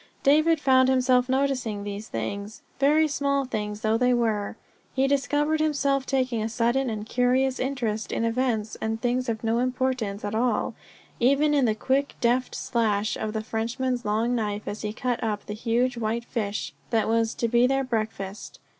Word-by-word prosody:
David 310 +3 +4
found 260 -2 +4
himself 255 -1 +3
noticing 260 -6 0
these 205 +1 -6
things 200 - -5 0.2
very 300 +3 +4
small 280 -1 0
things 210 -3 -4
though 220 0 +1
they 250 0 +3
were; 220 -4 -1 0.4
he 265 0 +3
discovered 290 +3 +1
himself 280 -3 +1
taking 255 -4 0
a 220 - -1
sudden 240 +3 +1
and 215 -1 -4
curious 255 +2 +1
interest 240 -5 -2
in 230 - 0
events 230 -2 0
and 220 0 -2
things 250 +1 0
of 220 -1 -3
no 225 +1 +1
importance 250 -5 -1
at 205 - -3
all, 240 +3 0 0.5
even 280 +5 +3
in 280 -3 +3
the 215 -2 +2
quick, 270 +5 0
deft 245 +1 +1
slash 215 -3 0
of 215 -1 -3
the 220 -1 -2
Frenchman's 240 +3 -2
long 220 +4 0
knife 210 -3 -2
as 205 - -4
he 210 - -2
cut 245 +2 -2
up 210 -2 -2
the 210 - -5
huge 240 +3 0
whitefish 220 -2 -2 0.2
that 225 -2 +1
was 225 0 +1
to 235 - 0
be 240 +2 +4
their 270 +1 +1
breakfast. 215 -5 -4
240 Hz, 170 wpm, -26 LUFS, 220-260 Hz, 0.5 s, David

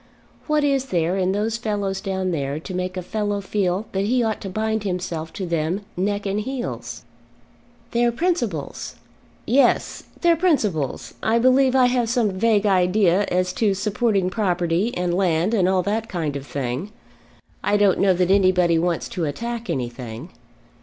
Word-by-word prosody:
What 305 -1 +2
is 275 -2 +1
there 175 -6 0
in 190 -1 +1
those 215 +3 -1
fellows 205 -4 -2
down 190 -2 -2
there 140 -2 -2
to 185 +4 -8
make 185 +1 -3
a 185 - -3
fellow 205 +1 -2
feel 195 0 -1
that 195 +1 -1
he 245 +3 +2
ought 220 -2 -1
to 195 - -5
bind 220 +2 -1
himself 175 -4 -3
to 190 - -4
them 170 +3 -1
neck 200 +3 -1
and 200 +1 -1
heels?" 255 +3 -5 0.9
"Their 240 0 +2
principles." 235 - -2 0.5
"Yes, 265 +5 +2 0.2
their 340 -1 +5
principles! 215 - 0
I 225 +1 +2
believe 255 +2 +4
I 260 -1 +6
have 245 -2 +1
some 235 -4 +1
vague 215 +2 +2
idea 190 0 +3
as 185 0 0
to 200 0 +1
supporting 200 -1 0
property 180 0 0
and 180 -1 0
land 180 +2 +1
and 190 -5 +3
all 185 -1 +2
that 220 +4 -2
kind 160 -6 -2
of 140 0 -6
thing. 140 +8 -3 0.7
I 205 - +2
don't 205 -2 +3
know 190 -2 +4
that 180 +1 +1
anybody 185 -4 +4
wants 170 0 -1
to 170 - -2
attack 235 +8 -4
anything." 125 -1 -5
195 Hz, 165 wpm, -22 LUFS, 180-225 Hz, 0.9 s, I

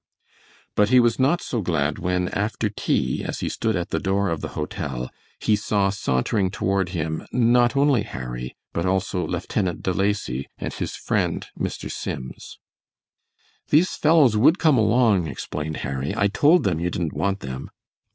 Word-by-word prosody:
But 105 0 +3
he 130 0 +6
was 120 0 +3
not 145 +7 +2
so 120 - -2
glad 80 -5 0
when, 90 0 0
after 105 +1 -1
tea, - - -1
as - - -4
he - - -1
stood 110 -2 -1
at 85 -2 -2
the - - -1
door 100 +1 0
of 80 - -2
the - - -3
hotel, 65 -3 -4 0.3
he 110 - +2
saw 100 -1 +1
sauntering 95 - 0
toward 95 -1 0
him 80 -3 -3
not 120 +1 +3
only 140 -4 +4
Harry, 60 -8 -6 0.2
but 85 - -1
also 95 -1 0
Lieutenant 90 +2 -2
De 95 - 0
Lacy 95 -10 -1
and - - -5
his - - -4
friend - - -1
Mr. - - -4
Sims. 65 0 -6 1.1
"These 165 +5 +4
fellows 150 -7 +4
would 135 - +5
come 155 -7 +4
along," 110 -5 +3
explained 75 +1 -5
Harry; 70 +6 -3
"I 105 -2 +3
told 150 - +4
them 90 -5 0
you 85 +1 0
didn't 85 -3 -3
want 100 0 -1
them." 65 0 -6
100 Hz, 165 wpm, -23 LUFS, 80-115 Hz, 1.1 s, he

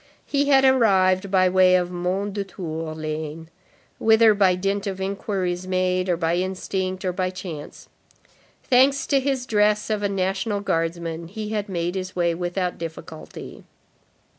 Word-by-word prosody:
He 285 0 0
had 270 -1 +5
arrived 195 -7 +3
by 185 -1 +4
way 185 0 +5
of 180 -1 +1
Mondétour 180 -3 -4
lane, 155 +1 -5 0.5
whither 220 0 +5
by 195 -3 +3
dint 195 +2 -2
of 190 -1 -4
inquiries 190 -2 -3
made, 185 0 0
or 175 - +2
by 165 0 0
instinct, 185 0 -3
or 180 - 0 0.2
chance. 180 -5 -8 0.8
Thanks 270 +2 +3
to 275 - +2
his 265 -2 -1
dress 210 -1 +2
of 210 -1 0
a 205 - 0
National 195 +2 -1
Guardsman, 165 -2 -2
he 210 +4 -6
had 210 -1 -3
made 175 -1 -2
his 185 -1 -5
way 170 -1 +1
without 180 +1 -3
difficulty. 160 -1 -9
185 Hz, 140 wpm, -23 LUFS, 175-205 Hz, 0.8 s, had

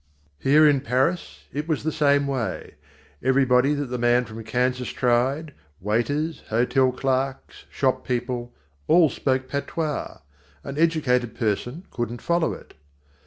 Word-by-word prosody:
Here 150 +3 +5
in 140 -3 +3
Paris 135 +7 -1
it 150 +2 -3
was 155 -4 -1
the 160 - 0
same 145 -2 +3
way. 130 -5 -3 0.5
Everybody 130 +1 +3
that 145 0 -2
the 125 - -2
man 120 +1 +3
from 110 0 -9
Kansas 125 +2 -1
tried 130 +5 0 0.3
waiters, 140 - -1
hotel 125 +3 +2
clerks, 135 +1 -2
shop 130 -2 0
people 120 -1 -3 0.4
all 165 -4 +5
spoke 130 -1 -1
patois. 145 +2 -3 0.5
An 140 +1 -6
educated 135 -8 +1
person 120 - -2
couldn't 120 -1 -4
follow 170 -1 +1
it. - - -10
130 Hz, 130 wpm, -24 LUFS, 125-145 Hz, 0.5 s, Here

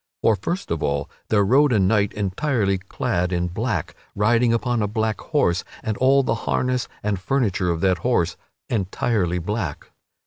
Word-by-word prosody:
For 110 - +5
first 175 - -4
of 80 - -1
all 70 0 -1 0.2
there 105 -2 +4
rode 135 +6 +4
a 115 - +3
knight 100 +1 +2
entirely 100 0 0
clad 90 -1 -2
in 90 0 0
black, 105 -2 -2 0.2
riding 115 +3 +3
upon 120 0 0
a 105 - +1
black 110 +1 -1
horse, 145 - +1 0.2
and 110 - -1
all 135 +2 +4
the 115 -3 +1 0.2
harness 125 -1 0 0.2
and 105 -2 -1
furniture 100 -5 0
of 85 -1 -1
that 95 -2 +2
horse 90 -7 +1 0.3
entirely 100 -3 0
of 85 - -5
black. 105 -8 -3
105 Hz, 170 wpm, -23 LUFS, 90-120 Hz, 0.3 s, For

